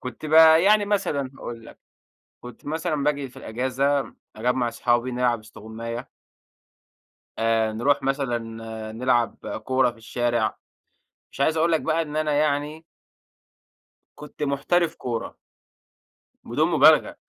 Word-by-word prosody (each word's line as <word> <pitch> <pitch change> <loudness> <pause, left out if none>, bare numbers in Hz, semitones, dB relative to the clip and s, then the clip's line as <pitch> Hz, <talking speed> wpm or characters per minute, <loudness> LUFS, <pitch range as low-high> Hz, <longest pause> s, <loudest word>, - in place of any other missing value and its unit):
كنت 130 +4 -7
بقى 160 +1 +7
يعني 210 +2 +4
مثلًا 175 -10 -1
هاقول 115 -1 -8
لك، - - -14 0.6
كنت 125 +2 -12
مثلًا 155 -1 -2
باجي 145 -2 0
في - - -20
الإجازة 130 +4 -1 0.2
أجمّع 125 +2 0
أصحابي 120 +1 0
نلعب 125 -2 0
استغُماية. 110 +3 -8 1.3
آآ، 115 -1 +1
نروح 135 +5 +1
مثلًا 135 -3 0 0.5
نلعب 120 0 -1
كورة 130 -1 +2
في 115 - -19
الشارع، 120 -1 -1 0.7
مش - - -6
عايز 160 +3 +2
أقول 165 +2 +2
لك 160 - +2
بقى 160 +1 0
إن 150 -2 -6
أنا 155 -1 0
يعني 150 +2 -1 1.3
كنت 150 0 -8
محترف 155 +5 0
كورة. 115 -2 -5 1.1
بدون - - 0
مبالغة، - - +5
135 Hz, 120 wpm, -24 LUFS, 120-155 Hz, 1.3 s, بقى